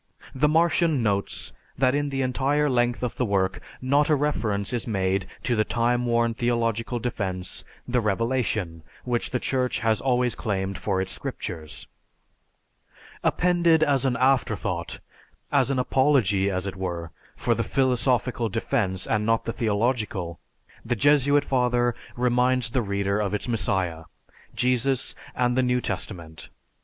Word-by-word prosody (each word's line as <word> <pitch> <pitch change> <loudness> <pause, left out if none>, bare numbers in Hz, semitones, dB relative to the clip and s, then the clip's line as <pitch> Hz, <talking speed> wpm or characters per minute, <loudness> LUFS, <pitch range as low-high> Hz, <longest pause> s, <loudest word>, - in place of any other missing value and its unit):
The 140 +3 +2
Martian 160 -3 +2
notes 100 -2 -1 0.2
that 130 -1 +3
in 145 0 0
the 135 -1 -1
entire 140 +3 +1
length 120 0 +1
of 125 - -3
the - - +1
work 95 -4 0 0.2
not 140 +3 +3
a 155 - +5
reference 110 -8 -1
is 120 -1 -2
made 95 -3 0 0.2
to 120 - +1
the 110 - +3
time 120 +2 0
worn 115 0 +2
theological 115 0 -1
defense, 95 -6 -3 0.2
"the 125 0 +1
revelation" 105 -5 -1 0.2
which 120 -1 -1
the 125 - -1
Church 130 -1 0
has 110 -1 +1
always 125 -2 +2
claimed 95 -3 -3
for 95 -1 -1
its 95 0 -3
scriptures. 80 -4 -5 1.4
Appended 170 -2 +3
as 140 -4 +2
an 130 -3 +1
afterthought, 105 - 0 0.5
as - - +3
an 135 - 0
apology, 125 -7 +2
as 95 -1 -2
it 100 - -4
were, 85 -3 -4 0.2
for - - +1
the - - -1
philosophical 125 -2 +1
defense 105 -4 0
and 105 -1 0
not 115 +1 +1
the 115 - -2
theological, 105 -6 -1 0.4
the 120 +1 -1
Jesuit 145 +2 +4
father 125 -2 +2 0.2
reminds 125 0 +2
the 130 - +1
reader 100 -1 -1
of 105 -1 -1
its 105 - -4
messiah, 95 -7 0 0.5
Jesus 125 +1 +1 0.2
and 125 -1 +1
the 130 - +3
New 125 0 +2
Testament. 85 -9 -5
120 Hz, 145 wpm, -25 LUFS, 100-130 Hz, 1.4 s, a